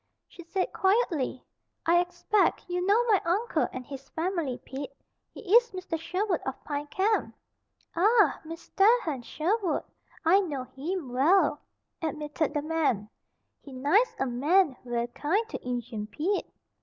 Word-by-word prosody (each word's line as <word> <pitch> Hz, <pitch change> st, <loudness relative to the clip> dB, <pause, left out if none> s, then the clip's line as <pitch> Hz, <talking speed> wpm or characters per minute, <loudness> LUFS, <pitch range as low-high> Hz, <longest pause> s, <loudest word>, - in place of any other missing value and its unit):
She 350 Hz, -, -12 dB
said, 370 Hz, +3 st, -2 dB
quietly: 380 Hz, -, +1 dB, 0.4 s
"I 340 Hz, +1 st, +5 dB
expect 360 Hz, +4 st, +1 dB
you 360 Hz, 0 st, -1 dB
know 410 Hz, +5 st, +4 dB
my 435 Hz, -5 st, +3 dB
uncle 390 Hz, +8 st, +1 dB
and 255 Hz, -1 st, -7 dB
his 275 Hz, 0 st, -9 dB
family, 325 Hz, -6 st, -2 dB
Pete. 275 Hz, +1 st, -6 dB, 0.4 s
He -, -, -11 dB
is 475 Hz, 0 st, +6 dB
Mr. 365 Hz, -3 st, -4 dB
Sherwood 370 Hz, +2 st, -1 dB
of 265 Hz, 0 st, -5 dB
Pine 290 Hz, 0 st, -4 dB
Camp." 400 Hz, +7 st, 0 dB, 0.6 s
"Ah! 425 Hz, +8 st, +4 dB
Mis 330 Hz, +1 st, -9 dB
tair 440 Hz, +5 st, +5 dB
Hen 290 Hz, -, -3 dB
Sherwood! 345 Hz, -, -1 dB, 0.4 s
I 365 Hz, +5 st, +6 dB
know 295 Hz, -9 st, -2 dB
heem 290 Hz, +2 st, -5 dB
well," 320 Hz, +10 st, +3 dB, 0.4 s
admitted 305 Hz, -1 st, -2 dB
the 295 Hz, -, 0 dB
man. 295 Hz, -10 st, 0 dB, 0.5 s
"He 280 Hz, -, -12 dB
nice 295 Hz, -, +2 dB
a 270 Hz, -, +1 dB
man 290 Hz, +5 st, +2 dB
ver' 240 Hz, -1 st, -1 dB
kind 320 Hz, -, -1 dB
to -, -, -6 dB
Injun 240 Hz, -3 st, -4 dB
Pete." 355 Hz, -, -1 dB
325 Hz, 145 wpm, -28 LUFS, 275-385 Hz, 0.6 s, is